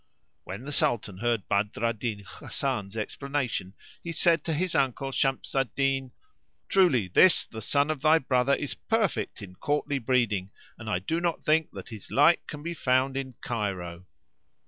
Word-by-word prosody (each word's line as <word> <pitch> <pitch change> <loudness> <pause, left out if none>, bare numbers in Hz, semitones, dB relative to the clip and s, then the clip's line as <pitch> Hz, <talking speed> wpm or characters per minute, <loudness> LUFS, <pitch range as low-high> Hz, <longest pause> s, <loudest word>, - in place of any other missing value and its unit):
'" - - -49
When 100 +6 -7
the 145 - -6
Sultan 105 -8 0
heard 120 -2 0
Badr 105 +3 0
al 115 - +2
Din 110 -2 -4
Hasan's 105 0 -4
explanation 125 -4 -3 0.3
he 170 - -4
said 165 -1 +3
to 165 - 0
his 180 +3 -1
uncle, 135 0 0
Shams 135 0 0
al 135 -1 +2
Din, 135 -1 0 0.6
"Truly 145 - +4
this 175 - +5
the 110 - -8
son 140 +7 +2
of 150 -4 -4
thy 155 +2 +6
brother 130 -1 +2
is 145 - -3
perfect 220 - -1
in 90 -2 -10
courtly 145 -1 -1
breeding 110 -6 +1 0.3
and 110 -1 -6
I 90 - +1
do 160 - -2
not 170 -1 -1
think 155 +1 +2
that - - -9
his 110 -4 -10
like 150 +5 +4
can 150 -2 -7
be 170 +1 -3
found 130 -3 +1
in 130 -2 -4
Cairo." 95 -6 -4
130 Hz, 175 wpm, -27 LUFS, 110-145 Hz, 0.6 s, thy